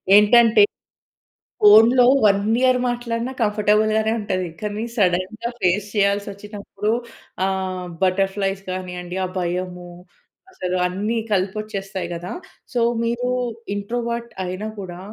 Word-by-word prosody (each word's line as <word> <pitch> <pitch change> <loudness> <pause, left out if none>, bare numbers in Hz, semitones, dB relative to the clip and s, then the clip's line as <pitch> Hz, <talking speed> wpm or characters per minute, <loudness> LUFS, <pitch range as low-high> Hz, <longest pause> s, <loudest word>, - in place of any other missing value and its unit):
ఏంటంటే 230 - +6 1.0
ఫోనులో 225 +4 +7 0.2
1 200 -1 +4 0.2
ఇయర్ 255 -1 +4
మాట్లాడినా 240 0 -2
కంఫర్టబుల్ 210 0 +2
గానే 220 0 +1
ఉంటది. 185 -3 -2
కానీ 210 +1 -3
సడెన్‌గా 195 +4 0
ఫేస్ 195 +3 +1
చేయాల్సోచ్చినప్పుడు, 205 +1 -2 0.5
ఆహ్, 185 -1 -2
బటర్ 190 +1 +2
ఫ్లై‌స్ 195 -1 -2
గానియండి, 180 -1 -5
ఆ - - -3
భయము 180 0 -3 0.6
అసలు 185 - -3
అన్ని 205 +6 -2
కలిపొచ్చేస్తాయి 195 -1 -2
గదా! 175 +1 -6 0.4
సో, 245 - +1 0.2
మీరు 235 +2 -1 0.5
ఇంట్రోవర్ట్ 235 +3 -3
అయినా 185 +4 -4
కూడా 180 -2 -7
205 Hz, 105 wpm, -21 LUFS, 185-220 Hz, 1.0 s, ఫోనులో